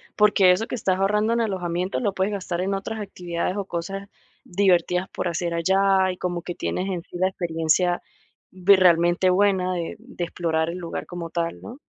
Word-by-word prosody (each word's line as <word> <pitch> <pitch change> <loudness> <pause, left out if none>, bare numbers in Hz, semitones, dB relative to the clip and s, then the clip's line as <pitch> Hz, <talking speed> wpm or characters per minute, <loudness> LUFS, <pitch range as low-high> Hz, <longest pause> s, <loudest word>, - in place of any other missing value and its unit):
Porque 205 -3 +5
eso 185 +5 +1
que - - -7
estás 190 -5 0
ahorrando 210 +3 +2
en 235 - +1
alojamiento, 180 -3 -2
lo 205 -5 0
puedes 190 +2 0
gastar 180 -3 -3
en 195 +2 -1
otras 195 +3 -4
actividades, 180 -3 -3
o, 200 -1 -3
cosas 195 +3 -5 0.3
divertidas 180 -1 +2
por - - -3
hacer 170 0 -2
allá, 190 +2 +3
y 180 - -8
como 175 -1 -3
que 175 0 -6
tienes 185 +2 -2
en 180 -3 -3
sí 175 - -9
la 185 +1 +2
experiencia 175 0 0 0.5
realmente 180 -1 +4
buena 185 -1 +2
de 170 -1 -4
de 230 -6 -7
explorar 160 -2 -1
el 175 +2 -5
lugar 170 -2 -5
como 175 -2 -6
tal, 170 0 -3
¿no? 240 - -9
185 Hz, 185 wpm, -24 LUFS, 175-195 Hz, 0.5 s, Porque